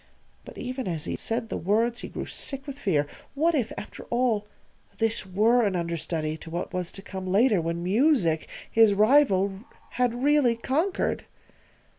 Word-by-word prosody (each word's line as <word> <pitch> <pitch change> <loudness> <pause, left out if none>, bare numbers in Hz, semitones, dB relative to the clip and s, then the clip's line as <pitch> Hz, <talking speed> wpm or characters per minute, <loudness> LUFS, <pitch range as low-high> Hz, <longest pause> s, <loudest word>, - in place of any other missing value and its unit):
But - - -11
even 255 -1 -4
as 165 -4 -3
he - - -3
said 225 0 -1
the - - -2
words 230 +6 +1
he - - -5
grew - - -5
sick 275 -1 -2
with 280 -1 -7
fear. 150 -7 +1 0.3
What 325 +4 +2
if, 250 -7 0
after - - -8
all, 235 -4 0 0.5
this 225 -3 0
were 220 +6 +3
an 200 -3 +1
understudy 165 -2 -2
to 165 - -11
what 175 +3 -4
was 180 -1 -2
to 195 - -8
come 190 -2 -6
later 205 +1 +3
when 170 +1 -3
Music, 195 - +2 0.2
his 220 -3 +5
rival, 200 -4 +4 0.3
had 245 0 0
really 290 -5 +4
conquered? 310 +11 -1
220 Hz, 165 wpm, -26 LUFS, 185-250 Hz, 0.5 s, his